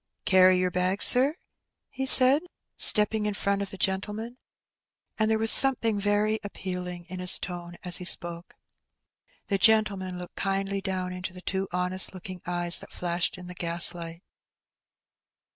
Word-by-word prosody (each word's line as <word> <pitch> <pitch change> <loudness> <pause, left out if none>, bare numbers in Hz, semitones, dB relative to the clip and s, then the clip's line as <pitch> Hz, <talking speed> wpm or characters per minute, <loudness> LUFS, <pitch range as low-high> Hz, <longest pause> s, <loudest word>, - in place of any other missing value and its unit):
''Carry 185 -1 +2
yer 180 0 -3
bag, 185 +2 -3
sir?" 270 +5 +4 0.6
he 265 0 -6
said, 265 +3 +8 0.3
stepping 210 0 +4
in 210 - -5
front 200 -1 -4
of 200 - -5
the 195 - -10
gentleman; 210 +6 -6 0.8
and 220 0 -1
there 220 - -1
was 225 0 +3
something 230 -6 +5
very 205 +2 -2
appealing 180 -3 -9
in 185 +1 -11
his 180 0 +4
tone 175 -1 -10
as 180 -1 +3
he 180 - -8
spoke. 170 -1 -1 0.9
The 195 -2 -4
gentleman 200 -4 0
looked 180 0 -12
kindly 195 0 -4
down 185 -2 -6
into 180 0 -8
the 180 - -13
two 190 +1 -5
honest 180 +1 0
k)oking 185 -1 -12
eyes 175 -1 0
that - - -12
flashed 175 +1 -4
in 180 - -13
the 180 - -11
gaslight. 170 0 -2
185 Hz, 155 wpm, -24 LUFS, 180-210 Hz, 0.9 s, said